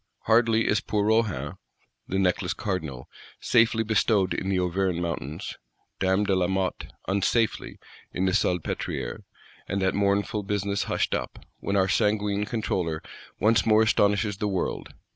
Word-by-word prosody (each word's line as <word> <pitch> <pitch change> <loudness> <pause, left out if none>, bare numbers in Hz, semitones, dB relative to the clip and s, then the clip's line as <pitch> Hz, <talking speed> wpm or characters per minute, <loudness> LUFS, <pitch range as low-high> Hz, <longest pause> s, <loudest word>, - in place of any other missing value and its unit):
Hardly 115 0 +3
is 105 - +2
poor 105 -1 -1
Rohan, 110 -1 0 0.5
the 95 - -2
Necklace 90 -2 +1
Cardinal, 80 -11 -4 0.3
safely 115 0 +3
bestowed 105 -4 +2
in 95 - -2
the 95 - +1
Auvergne 90 0 0
Mountains, 85 0 -4 0.4
Dame 95 +2 +2
de 100 -2 +1
Lamotte 95 0 -1 0.2
(unsafely) 100 +3 0 0.3
in 95 - -1
the 95 - +2
Salpêtrière, 90 -2 -1 0.5
and 100 - -1
that 95 - +2
mournful 100 +1 +1
business 100 -1 -1
hushed - - 0
up, - - -4
when 100 - -2
our 95 -1 +3
sanguine 105 0 +1
Controller 90 -8 -2 0.4
once 110 +1 +4
more 110 0 +5
astonishes 105 -1 +2
the 105 - -1
world. 95 -3 -2
100 Hz, 140 wpm, -26 LUFS, 95-105 Hz, 0.5 s, more